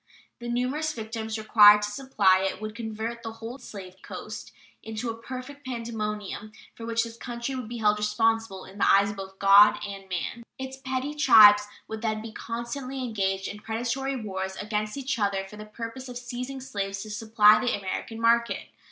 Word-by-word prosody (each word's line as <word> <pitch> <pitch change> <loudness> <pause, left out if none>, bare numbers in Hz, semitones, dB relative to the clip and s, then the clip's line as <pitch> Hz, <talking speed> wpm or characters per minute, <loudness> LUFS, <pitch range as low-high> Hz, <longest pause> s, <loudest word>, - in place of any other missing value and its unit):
The 240 0 -6
numerous 265 +6 -1
victims 220 0 -5
required 210 -1 +7
to 210 - -2
supply 205 -6 +3
it 190 0 -2
would 215 0 -5
convert 225 +1 -5
the 225 -1 -6
whole 225 +4 -8
slave 190 -6 -10
coast - - -8 0.3
into 220 +2 -4
a - - -7
perfect 260 +4 -8
pandemonium, 215 -4 -5 0.2
for 230 - -9
which 230 0 +1
this 230 0 -8
country 240 +2 -5
would 255 -4 -5
be 240 - -5
held 210 -1 +2
responsible 215 -1 0
in 195 +2 -13
the - - +4
eyes 200 +1 +4
both 195 -1 -8
of - - -33
God 200 +2 +7
and 195 -1 -9
man. 185 +6 -3 0.2
Its 265 0 -6
petty 265 +2 -3
tribes 210 -8 +7 0.2
would 220 0 -6
then 215 -2 -1
be 220 +1 -8
constantly 245 +4 -5
engaged 195 -5 -1
in 210 - -7
predatory 240 +5 -2
wars 190 -3 -4
against 210 +3 -3
each 270 -3 -2
other 200 -2 0
for 210 +2 -12
the 210 - -8
purpose 235 +4 -7
of 245 - -6
seizing 250 +2 -6
slaves 195 -6 -4
to 215 - -9
supply 215 -1 +5
the 245 -3 0
American 205 +3 -5
market. 235 +1 +2
225 Hz, 185 wpm, -27 LUFS, 210-240 Hz, 0.3 s, required